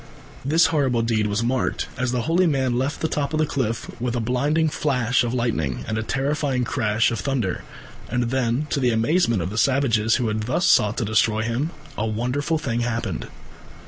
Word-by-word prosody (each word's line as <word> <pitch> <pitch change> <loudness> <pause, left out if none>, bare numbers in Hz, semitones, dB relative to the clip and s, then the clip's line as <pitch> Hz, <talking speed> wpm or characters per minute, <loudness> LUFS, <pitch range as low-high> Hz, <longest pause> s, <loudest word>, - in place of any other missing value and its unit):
This 160 +5 +4
horrible 130 -6 +2
deed 110 -2 +1
was 105 +3 -1
marked, 125 +2 -1
as 125 0 -1
the 125 -2 -1
holy 175 +6 +2
man 130 -5 +1
left 130 +4 -2
the 160 - +1
top 145 -1 -2
of - - +1
the 155 - +2
cliff, 125 -6 -2
with 125 -1 -1
a - - 0
blinding 140 +7 +1
flash 125 -6 +1
of 120 - -1
lightning 110 - -1
and 110 - -2
a 110 - -1
terrifying 135 +1 -1
crash 110 -2 +1
of 115 - -2
thunder, 125 -9 -2 0.5
and 120 0 -1
then, 130 +2 0
to 140 - +1
the 125 -2 +2
amazement 115 - +2
of 90 - -4
the 105 - -1
savages 120 -5 +2
who 125 - 0
had 110 0 -1
thus 170 +8 +1
sought 105 +1 +4
to 115 - 0
destroy 110 +1 +2
him, 120 +7 -1 0.3
a 110 - 0
wonderful 125 +8 -1
thing 120 -6 -2
happened. 120 -1 -2
125 Hz, 200 wpm, -23 LUFS, 115-140 Hz, 0.5 s, This